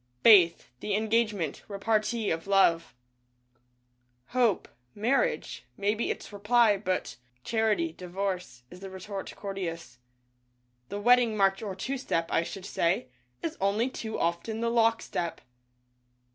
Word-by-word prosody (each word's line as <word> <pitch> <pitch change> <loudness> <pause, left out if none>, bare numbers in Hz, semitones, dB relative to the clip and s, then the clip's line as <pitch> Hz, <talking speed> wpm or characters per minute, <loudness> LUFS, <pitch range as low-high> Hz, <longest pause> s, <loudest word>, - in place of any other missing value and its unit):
Faith 180 - +6
— 125 - -44
The 205 +6 -1
Engagement 215 -6 0
— - - -33
repartee 215 +2 0
of 165 +3 -3
Love. 170 -7 +3 1.3
Hope 240 -5 +2 0.2
— 125 - -43
Marriage 375 - 0
— - - -42
maybe 210 +3 0
its - - -5
reply, 210 +1 +4
but 185 - -3 0.3
Charity 215 -8 +1
— - - -31
Divorce 180 -8 -4
— - - -40
is 180 - -11
the 195 0 -8
retort 190 +1 -7
courteous. 170 -10 -5 0.9
The 205 - -4
wedding 240 0 +4
march 195 -1 +3
or 200 -4 -4
two 265 +8 -3
step, 165 -10 -1
I - - +3
should 185 +2 -7
say, 170 -9 0 0.3
is 325 -1 -2
only 210 +6 +1
too 220 -3 -5
often 170 +7 -1
the 230 0 0
lock 230 -1 +3
step. 170 -1 -3
200 Hz, 145 wpm, -28 LUFS, 175-225 Hz, 1.3 s, Faith